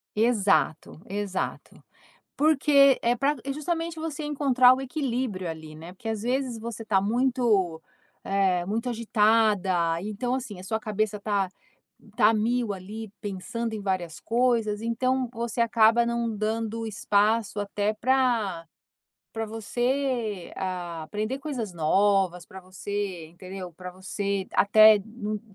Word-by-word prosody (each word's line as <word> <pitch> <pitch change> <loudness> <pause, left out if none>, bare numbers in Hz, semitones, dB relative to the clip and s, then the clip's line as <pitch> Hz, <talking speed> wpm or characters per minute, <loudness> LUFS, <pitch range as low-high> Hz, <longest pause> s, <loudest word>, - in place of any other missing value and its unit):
Exato, 210 -9 +1
exato, 200 -1 -4 0.5
porque 280 -2 +5
é 235 +1 +3
pra 280 +4 +1
é 275 - -2
justamente 330 +2 -3
você 315 -1 -4
encontrar 260 -4 +5
o 265 - -5
equilíbrio 250 - -2
ali 160 -1 -7
né, 165 +3 -10
porque 225 +4 -8
as 220 -1 -2
vezes 250 -1 -1
você 225 0 -6
tá 195 -3 +2
muito, 220 -7 +1 0.4
eh, 190 -3 +1
muito 230 +5 -2
agitada 210 -7 +2
então 215 +5 -2
assim 240 -7 -5
a 185 - -9
sua 220 +3 -2
cabeça 215 -1 -2
tá 200 -3 0 0.7
tá 220 -1 +5
mil 230 0 0
ali 205 +3 -7
pensando 220 +3 -4
em 210 - -4
várias 185 -4 -2
coisas, 230 -3 +1
então 255 +2 0
você 235 0 -3
acaba 230 0 +4
não 235 -1 -1
dando 225 +1 -2
espaço 210 0 +1
até 205 +1 -1
pra 225 -8 +1 0.7
pra 225 -1 -3
você, 235 -2 -2
hã, 175 -3 -4
aprender 215 +10 -3
coisas 255 -9 -4
novas, 180 +1 +2
pra 190 -2 -11
você 185 -2 -5
entendeu, 185 +1 -9
pra 180 +2 -9
você 195 +1 -3
até 215 +1 +7
num 215 -2 -5
215 Hz, 130 wpm, -26 LUFS, 195-240 Hz, 0.7 s, até